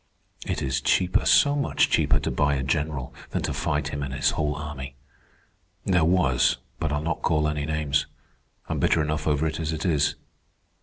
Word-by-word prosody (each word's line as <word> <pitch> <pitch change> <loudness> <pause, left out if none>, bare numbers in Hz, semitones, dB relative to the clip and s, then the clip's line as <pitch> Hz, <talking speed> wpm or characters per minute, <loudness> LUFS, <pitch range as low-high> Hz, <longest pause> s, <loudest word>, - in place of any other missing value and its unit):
It - - -2
is 65 0 -1
cheaper, 90 +6 +2
so 145 0 +5
much 140 -1 +1
cheaper, - - +3
to - - -2
buy 70 0 +1
a 65 - -2
general 75 -2 -2 0.2
than - - -2
to - - -2
fight - - -1
him 75 - -4
and 70 -2 -4
his - - +2
whole 75 -1 -1
army. 70 -3 -7 0.9
There 90 -4 +3
was—but 80 -2 +1
I'll 75 +1 -1
not 85 +1 -2
call 75 -2 +1
any 75 -1 -2
names. 75 -2 0 0.6
I'm - - -2
bitter 80 - +2
enough 75 +1 -2
over 75 0 +1
it 80 0 -2
as 80 -1 -2
it 80 +2 -4
is. 75 -5 +2
75 Hz, 185 wpm, -25 LUFS, 70-80 Hz, 0.9 s, so